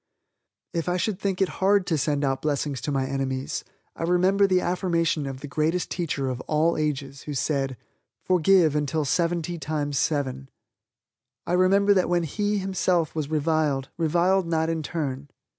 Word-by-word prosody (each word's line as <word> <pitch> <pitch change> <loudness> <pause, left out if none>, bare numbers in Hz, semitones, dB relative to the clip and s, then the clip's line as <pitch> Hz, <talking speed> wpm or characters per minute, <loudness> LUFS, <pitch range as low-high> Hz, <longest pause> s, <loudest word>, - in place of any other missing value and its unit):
If 170 0 -1
I 180 - +1
should 190 +1 -1
think 195 -1 0
it - - +1
hard 195 0 +4
to 165 - 0
send 145 -1 0
out 135 -1 -1
blessings 145 -2 -1
to 145 - -3
my 135 -1 0
enemies, 135 0 -3 0.3
I - - -9
remember 185 +4 +3
the 185 -1 +3
affirmation 170 -5 0
of 135 -1 -6
the 145 - -6
Greatest 155 +5 -1
Teacher 145 -6 -2
of 130 -1 -3
all 155 +2 +2
ages 140 -3 -3
Who 145 - -3
said, 135 -2 -1 0.5
"Forgive 180 -3 +4
until 150 +1 0
seventy 170 +2 0
times 145 -1 -2
seven." 135 -3 -1 1.0
I - - -2
remember 195 +3 +4
that 185 -2 +2
when 175 -1 +2
He, 205 +6 -1
Himself, 185 -4 0
was 155 -3 -3
reviled, 155 -3 0
reviled 175 +3 +2
not 160 0 +1
in 165 -1 -2
turn. 145 -3 -4
160 Hz, 165 wpm, -25 LUFS, 145-180 Hz, 1.0 s, hard